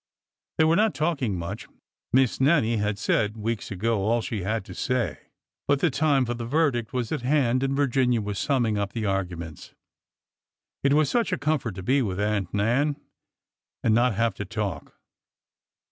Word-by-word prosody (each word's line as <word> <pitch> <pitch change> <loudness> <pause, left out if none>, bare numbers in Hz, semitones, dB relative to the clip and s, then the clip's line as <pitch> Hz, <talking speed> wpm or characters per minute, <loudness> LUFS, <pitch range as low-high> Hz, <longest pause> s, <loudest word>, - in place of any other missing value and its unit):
They - - +5
were 160 +1 +4
not 215 -6 +2
talking 140 - 0
much. 85 0 -6 0.4
Miss 130 0 +2
Nannie 130 -6 +3
had 105 -1 -1
said 105 +1 0
weeks 110 +1 -3
ago 110 +3 0
all 115 +4 +2
she 110 -2 -4
had 105 +2 -2
to 95 - -9
say. 125 +4 -1 0.5
But 140 -1 +3
the 165 +1 +2
time 140 -1 +2
for 120 - -2
the 120 0 -5
verdict 120 -4 0
was 125 -3 -2
at 155 -5 -1
hand 130 -1 +2
and 135 0 0
Virginia 130 -3 +2
was 105 -2 -3
summing 120 -7 +1
up 100 -1 -3
the 115 -2 -2
arguments. 90 -5 -4 1.1
It 140 0 +3
was 150 0 +4
such 235 - 0
a - - 0
comfort 140 -7 -1
to 95 - -7
be 135 +7 +2
with 100 -5 -2
Aunt 105 -3 -1
Nan 120 +9 +1 0.9
and 110 - +3
not 120 0 +3
have 115 0 +1
to - - -3
talk. 100 -2 -4
115 Hz, 175 wpm, -25 LUFS, 105-140 Hz, 1.1 s, They